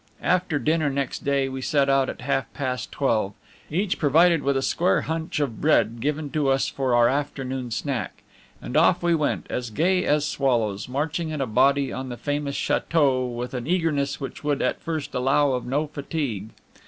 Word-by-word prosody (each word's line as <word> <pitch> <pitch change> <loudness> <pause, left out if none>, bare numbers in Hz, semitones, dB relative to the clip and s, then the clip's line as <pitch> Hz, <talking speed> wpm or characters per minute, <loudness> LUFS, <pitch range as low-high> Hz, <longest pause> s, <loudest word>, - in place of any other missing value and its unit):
After 180 -4 +1
dinner 155 +2 +1
next 140 -1 -3
day, 140 -1 +1
we 130 0 -5
set 140 +1 +2
out 135 -1 +3
at - - -7
half 135 -1 -1
past 130 -3 -3
twelve, 110 -7 0 0.4
each 185 +5 -1
provided 165 +2 +4
with 140 -1 +1
a 135 - -1
square 175 +6 +2
hunch 160 -1 -3
of 135 -7 -2
bread, 120 -6 +3
given 145 +3 -2
to 150 -3 0
us 135 0 +2
for 130 -3 0
our 120 0 +5
afternoon 135 -2 -2
snack. 130 +3 -3 0.4
And - - -7
off - - +4
we 175 0 +3
went, 155 -3 0
as 125 -1 -3
gay 180 - +1
as 150 0 +2
swallows, 120 -8 0
marching 155 +5 -2
in 155 -1 -4
a 135 - +1
body 140 +4 +2
on 130 0 -5
the 120 - -6
famous 145 +3 -2
chateau 135 -6 +1
with 120 +1 -5
an 125 0 -4
eagerness 160 -5 0
which 135 +1 -7
would 145 -1 0
at - - -1
first 160 -3 -4
allow 135 +2 +2
of 125 -1 -2
no 145 +5 0
fatigue. 140 - -4
140 Hz, 190 wpm, -24 LUFS, 130-150 Hz, 0.4 s, our